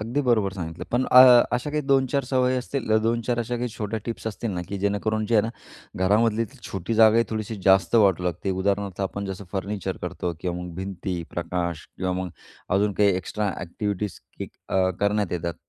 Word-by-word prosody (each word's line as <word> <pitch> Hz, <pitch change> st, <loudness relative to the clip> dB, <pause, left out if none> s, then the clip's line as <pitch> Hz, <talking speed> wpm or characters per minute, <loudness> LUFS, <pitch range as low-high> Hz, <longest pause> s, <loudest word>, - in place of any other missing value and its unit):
अगदी 120 Hz, +6 st, -1 dB
बरोबर 110 Hz, -7 st, +2 dB
सांगितलं 85 Hz, -4 st, -6 dB
पण 125 Hz, +2 st, +1 dB
अ, 125 Hz, -1 st, +8 dB
अशा 125 Hz, +4 st, -1 dB
काही 150 Hz, 0 st, 0 dB
दोन-चार 135 Hz, -1 st, +2 dB
सवयी 130 Hz, 0 st, +1 dB
असतील 125 Hz, -3 st, -1 dB
दोन-चार 115 Hz, +1 st, 0 dB
अशा 120 Hz, +1 st, -2 dB
काही 125 Hz, +1 st, -2 dB
छोट्या 110 Hz, +1 st, -2 dB
टिप्स 115 Hz, -1 st, -5 dB
असतील 110 Hz, +1 st, -3 dB
ना, 90 Hz, -3 st, -3 dB
की 100 Hz, -, -4 dB
जेणेकरून 105 Hz, +2 st, 0 dB
जे 115 Hz, -, 0 dB
आहे 105 Hz, -, +5 dB
ना 110 Hz, -, -2 dB, 0.6 s
घरामधली 110 Hz, +2 st, +3 dB, 0.2 s
छोटी 105 Hz, 0 st, -4 dB
जागाही 110 Hz, +1 st, +6 dB
थोडीशी 110 Hz, 0 st, -3 dB
जास्त 95 Hz, +3 st, +4 dB
वाटू 95 Hz, -5 st, +4 dB
लागते 90 Hz, +2 st, -2 dB
उदाहरणार्थ 100 Hz, 0 st, -1 dB
आपण 100 Hz, +1 st, -3 dB
जसं 95 Hz, +1 st, -6 dB
फर्निचर 100 Hz, 0 st, -3 dB
करतो 90 Hz, -, -3 dB
किंवा 90 Hz, -1 st, -2 dB
मग 90 Hz, -2 st, -8 dB
भिंती 95 Hz, -1 st, -4 dB
प्रकाश 85 Hz, -1 st, -3 dB
किंवा 90 Hz, 0 st, -1 dB
मग 90 Hz, -, -5 dB, 0.4 s
अजून 100 Hz, +1 st, +2 dB
काही 100 Hz, +1 st, +3 dB
एक्स्ट्रा 100 Hz, +3 st, -2 dB
ॲक्टिव्हिटीज 100 Hz, +2 st, -4 dB, 0.2 s
की -, -, -5 dB, 0.2 s
अ, 95 Hz, -1 st, +2 dB
करण्यात 100 Hz, -1 st, +1 dB
येतात. 85 Hz, -1 st, -2 dB
105 Hz, 185 wpm, -24 LUFS, 95-115 Hz, 0.6 s, अ